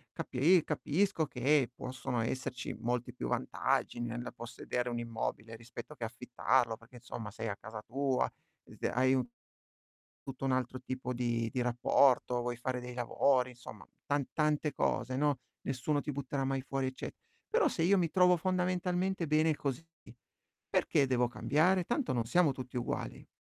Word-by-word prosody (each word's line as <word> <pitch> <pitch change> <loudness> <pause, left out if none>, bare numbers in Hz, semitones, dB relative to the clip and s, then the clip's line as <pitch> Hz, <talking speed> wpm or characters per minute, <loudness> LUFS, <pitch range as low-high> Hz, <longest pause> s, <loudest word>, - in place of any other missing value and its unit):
Capi 160 +6 +3
capisco 160 +3 +1
che 135 0 +2
possono 130 -2 -3
esserci 125 0 -3
molti 125 +1 -1
più - - -4
vantaggi 120 - 0
nella 120 +1 -3
possedere 120 +1 -4
un 120 0 -2
immobile 115 -1 -4
rispetto 120 +4 -9
che 120 - -7
affittarlo, 120 -1 +1
perché, 120 +2 -18
insomma, 110 -2 -7
sei 115 - -5
a 100 - -2
casa 110 0 -8
tua, 135 +3 0 0.3
dite - - -4
hai 130 +3 +3
un 125 -2 +1 1.0
tutto 135 0 -7
un 135 - +2
altro 130 0 0
tipo 130 -1 -4
di 120 -1 0
di 125 - -1
rapporto, 125 0 +3
vuoi 120 0 -2
fare 125 0 -2
dei 125 0 -7
lavori, 125 +1 +2
insomma, 110 - -11 0.2
tan 145 -2 +1
tante 150 -1 +1
cose, 130 - 0
no. 145 -1 +2 0.2
Nessuno 140 +2 0
ti 150 - -3
butterà 140 0 -2
mai 135 0 0
fuori, 135 -1 -1
ecce 130 - -5 0.3
però 460 0 +3
se 165 - -1
io 195 +3 +5
mi 170 -2 +1
trovo 180 0 +5
fondamentalmente 180 0 0
bene 155 0 +3
così, 140 +3 -3 0.8
perché 145 -4 +3
devo 125 -1 +2
cambiare? 170 +8 +2
Tanto 240 - 0
non 115 -2 0
siamo 170 +2 +4
tutti 130 -1 -7
uguali." 120 - -3
130 Hz, 160 wpm, -33 LUFS, 120-150 Hz, 1.0 s, io